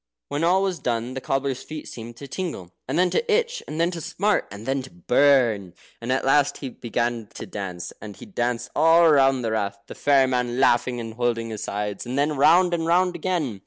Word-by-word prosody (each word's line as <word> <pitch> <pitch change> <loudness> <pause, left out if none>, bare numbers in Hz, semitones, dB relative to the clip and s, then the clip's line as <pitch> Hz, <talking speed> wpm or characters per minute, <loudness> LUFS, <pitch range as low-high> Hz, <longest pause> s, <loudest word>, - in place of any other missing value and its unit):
When 145 +3 -2
all 185 +3 +3
was 190 -3 -1
done 120 +1 -2
the 135 - -5
cobbler's 135 -1 -1
feet 155 -1 -8
seemed 115 0 -9
to 140 - -9
tingle, 135 - -5 0.2
and - - -1
then 180 0 +3
to 470 -1 0
itch, 470 +2 +1
and 155 - -5
then 170 +1 +2
to 170 -2 -6
smart, 205 +6 0
and 100 +2 -10
then 135 +1 0
to 130 - -10
burn. 110 -2 +2 0.3
And 120 +2 -3
at 130 - 0
last 140 +1 +3
he 135 - -6
began 120 -1 -3
to - - -6
dance, 90 -4 -6
and 105 -1 -8
he - - -11
danced 120 - -2
all 165 +2 +6
round 135 -3 +4
the 115 - -1
Rath 100 -2 -1
(the - - -9
fairy 140 -2 +3
man 125 -1 -1
laughing 120 -1 +2
and 115 -1 -6
holding 115 -1 -1
his 110 - -6
sides), 105 +3 -4
and 125 +2 -3
then 145 +2 +1
round 175 +6 +5
and 165 -1 -1
round 180 +1 +2
again. 160 - -2
130 Hz, 220 wpm, -24 LUFS, 115-165 Hz, 0.3 s, all